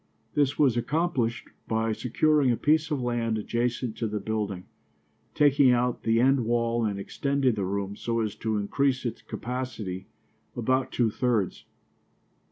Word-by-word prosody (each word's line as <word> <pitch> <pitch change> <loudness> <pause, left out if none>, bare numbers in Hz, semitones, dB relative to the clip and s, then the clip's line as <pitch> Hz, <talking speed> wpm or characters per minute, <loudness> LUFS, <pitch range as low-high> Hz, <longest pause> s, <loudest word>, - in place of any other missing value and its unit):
This 145 -1 +1
was 135 -6 +4
accomplished 130 -3 -1 0.2
by 110 0 0
securing 140 +5 +2
a 120 - +2
piece 155 +1 +2
of 150 -3 -1
land 115 -2 0
adjacent 120 +1 -2
to 115 - -1
the 105 0 -3
building, 100 -3 -3 0.7
taking 145 -3 +5
out 125 0 +1
the 115 0 +2
end 130 +1 +4
wall 115 0 +1
and 100 -2 -2
extending 140 +4 0
the 100 -3 -2
room 100 +1 -3
so 115 +2 -1
as 105 -2 -2
to 110 -1 -1
increase 130 +6 0
its 120 -1 -3
capacity 115 -7 -5 0.5
about 130 +2 0
two 115 -3 +1
thirds. 115 -6 -1
120 Hz, 150 wpm, -27 LUFS, 110-130 Hz, 0.7 s, taking